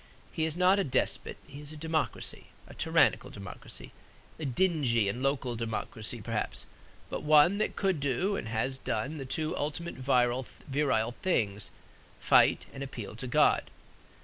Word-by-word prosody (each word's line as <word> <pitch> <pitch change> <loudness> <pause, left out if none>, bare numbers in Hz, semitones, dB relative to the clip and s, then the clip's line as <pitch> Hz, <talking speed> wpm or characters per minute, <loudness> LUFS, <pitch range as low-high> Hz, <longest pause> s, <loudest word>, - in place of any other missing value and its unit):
He 160 - 0
is 160 +1 -2
not 185 +2 +5
a - - +3
despot; 130 - -1
he 140 +1 -10
is 150 0 -9
a 155 - -9
democracy, 160 0 -2 0.2
a - - -12
tyrannical - - +3
democracy, 100 - -9 0.5
a 155 - -3
dingy 135 - +2
and 120 +6 -2
local 135 -3 0
democracy 115 0 -4
perhaps; 110 0 -3 0.5
but - - -3
one 155 +6 +5
that 215 - 0
could 190 -5 +1
do 145 - 0
and 110 - -4
has 120 +4 -1
done 150 +3 -2
the 135 - -5
two 155 +4 -1
ultimate 160 +4 -3
virile 130 -1 +1
things 110 - 0 0.5
fight - - +5
and 135 - -7
appeal 120 -6 -6
to 120 +3 -5
God. 120 - +3
135 Hz, 150 wpm, -30 LUFS, 120-160 Hz, 0.5 s, not